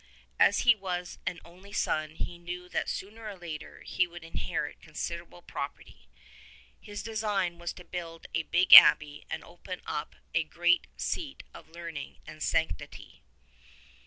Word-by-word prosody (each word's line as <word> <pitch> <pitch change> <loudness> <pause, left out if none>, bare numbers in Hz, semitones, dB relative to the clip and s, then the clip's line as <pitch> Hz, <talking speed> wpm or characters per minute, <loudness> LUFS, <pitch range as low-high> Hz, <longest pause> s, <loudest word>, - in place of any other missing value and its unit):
As - - +5
he 240 - +7
was 180 -4 -4
an 175 - -2
only 185 +4 -15
son 155 -5 -1
he 175 +1 -5
knew 180 +1 -6
that - - -1
sooner 220 +3 -6
or 205 - -7
later 160 -3 -8
he 180 - +1
would 175 0 -11
inherit 165 - -4
considerable - - -6
property. - - -7 0.7
His 205 -1 -7
design 210 -6 -1
was 175 0 -3
to 180 - -12
build 165 -2 -7
a 160 - +2
big 175 +3 +3
abbey 150 0 +10
and - - -4
open 180 +1 -8
up 150 - -4 0.2
a - - +3
great 175 +2 +2
seat 300 -6 -3
of - - -13
learning 165 -3 -7
and - - -10
of - - -18
sanctity. 160 - -2
175 Hz, 155 wpm, -30 LUFS, 165-190 Hz, 0.7 s, abbey